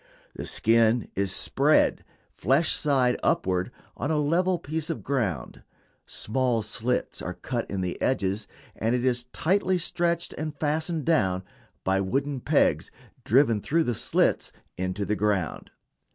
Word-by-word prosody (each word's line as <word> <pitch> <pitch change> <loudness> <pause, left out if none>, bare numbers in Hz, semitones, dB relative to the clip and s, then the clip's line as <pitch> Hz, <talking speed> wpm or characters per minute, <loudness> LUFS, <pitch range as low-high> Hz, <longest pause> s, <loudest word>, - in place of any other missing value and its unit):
The - - -6
skin 115 0 +3
is 100 -1 0
spread, - - +2 0.3
flesh 140 - +2
side 130 -4 +2
upward, 90 +3 +1 0.2
on 140 - -3
a 155 - +1
level 175 +5 +2
piece 160 0 -4
of 165 - -4
ground, 105 - -2 0.5
small 120 0 0
slits 115 +4 -2
are - - -5
cut - - -4
in 95 -1 -2
the 90 -1 -3
edges, 100 -4 0 0.3
and 115 +3 0
it 125 0 -1
is 125 -1 +1
tightly 185 +8 +1
stretched 170 -1 -1
and 155 -1 -4
fastened 155 +1 -1
down 95 - +2 0.4
by 95 +1 +2
wooden 135 +7 -1
pegs - - +2 0.4
driven 115 -3 +4
through 165 +8 +1
the 120 - -1
slits - - +1 0.2
into 95 +2 -2
the 105 - 0
ground. 100 -6 -1
125 Hz, 140 wpm, -26 LUFS, 105-155 Hz, 0.5 s, driven